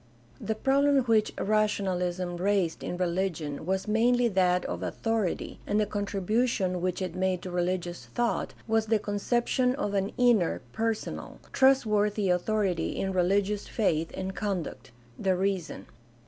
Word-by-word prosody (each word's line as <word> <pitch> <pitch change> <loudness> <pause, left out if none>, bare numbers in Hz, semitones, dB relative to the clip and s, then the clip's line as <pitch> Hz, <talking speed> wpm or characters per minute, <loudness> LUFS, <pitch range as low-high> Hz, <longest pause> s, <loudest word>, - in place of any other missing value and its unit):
— 120 - -26
The - - 0
problem 275 +3 +3
which 225 -3 +2
rationahsm 185 -4 0
raised 190 -3 0
in 175 - -3
religion 170 -4 -2
was 190 +2 -1
mainly 240 +3 +3
that 180 -2 +2
of - - -4
authority, 225 -5 -2
and 210 - +1
the 210 - +3
contribution 200 -1 0
which 185 +1 -1
it 180 -3 -4
made 185 -1 -1
to 185 - -5
religious 175 0 -2
thought 240 -1 -1
was 225 -1 +1
the 220 0 +3
conception 240 +5 0
of 205 -8 -2
an 195 0 0
inner, 230 - +3
personal, 225 -1 -3 0.2
trust 265 -1 +5
worthy 210 -2 +1
authority 180 -2 0
in 190 0 -2
religious 200 +3 +1
faith 165 -7 0
and 190 0 -4
conduct 195 -9 -4 0.2
— 120 +1 -26
the 190 -1 +3
reason. 190 -2 -2
195 Hz, 145 wpm, -28 LUFS, 180-220 Hz, 0.2 s, trust